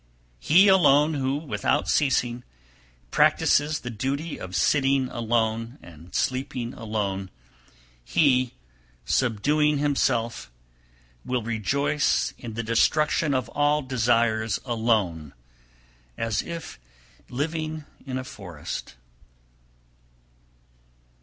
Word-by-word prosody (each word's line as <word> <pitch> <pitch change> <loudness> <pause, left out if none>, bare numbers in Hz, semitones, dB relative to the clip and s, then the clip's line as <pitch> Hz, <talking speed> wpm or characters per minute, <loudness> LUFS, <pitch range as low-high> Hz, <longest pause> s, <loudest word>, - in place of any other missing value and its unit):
305. - - -14
He 195 +3 +8
alone 155 -5 +5
who, 135 -2 -1
without 145 -1 -1
ceasing, 125 -4 +1 0.7
practises 150 +1 +3
the 125 - -5
duty 140 +8 -3
of 90 0 -7
sitting 135 +2 +2
alone 115 +1 -1
and 85 +1 -14
sleeping 130 -2 -2
alone, 100 -4 -3 0.7
he, 130 - +2 0.5
subduing 145 - +2
himself, 130 -5 0 0.7
will 125 -2 -2
rejoice 140 +7 0
in 115 -3 -7
the 115 - -2
destruction 150 +6 +2
of 130 -3 -1
all 145 +1 +1
desires 115 -3 +1
alone, 110 - 0 0.8
as 115 -2 -1
if 170 - -8 0.5
living 155 +3 -3 0.2
in 130 -2 -4
a 130 - -4
forest. 90 - -7
125 Hz, 95 wpm, -25 LUFS, 110-145 Hz, 0.8 s, He